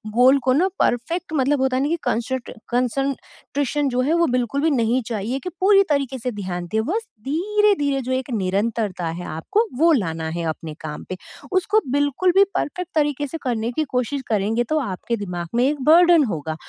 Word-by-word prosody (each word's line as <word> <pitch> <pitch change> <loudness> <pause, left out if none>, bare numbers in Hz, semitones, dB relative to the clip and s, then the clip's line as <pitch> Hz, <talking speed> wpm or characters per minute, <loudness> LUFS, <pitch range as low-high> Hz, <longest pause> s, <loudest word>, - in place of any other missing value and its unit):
गोल 255 +3 +6
को 255 - +4
ना 335 +8 +3
परफेक्ट 300 +7 0
मतलब 280 -1 +2
होता 260 -1 +1
है 265 - +1
ना 290 - 0
कि 335 - +1
कंसट्र 240 +2 -2 0.2
कंसंट्रेशन 275 +3 -2
जो 250 0 0
है, 285 +5 +1
वो 340 0 +3
बिल्कुल 250 +3 0
भी 320 - +3
नहीं 240 0 +2
चाहिए 230 +3 -2
कि 360 - -3
पूरी 395 0 +6
तरीके 275 -3 0
से 250 +2 -3
ध्यान 185 -5 -5
दे, 220 - +1
बस 425 - -2 0.2
धीरे-धीरे 350 -4 +1
जो 255 0 -4
एक 260 +1 -2
निरंतरता 200 -2 -1
है, 175 +2 -6
आपको 165 - 0
वो 335 +2 +5
लाना 165 - -1
है 170 - -3
अपने 155 0 -5
काम 150 -1 -6
पे। 185 - -4 0.4
उसको 375 +3 +3
बिल्कुल 285 +6 +2
भी 395 - +8
परफेक्ट 360 +3 -2
तरीके 290 -2 +1
से 325 - -5
करने 235 -2 -1
की 310 - -1
कोशिश 265 +3 0
करेंगे, 220 +2 +1
तो 310 +6 0
आपके 235 -1 -3
दिमाग 180 -4 -5
में 240 - +3
एक 290 -1 -1
बर्डन 340 0 +6
होगा। 160 - -3
260 Hz, 195 wpm, -22 LUFS, 220-295 Hz, 0.4 s, भी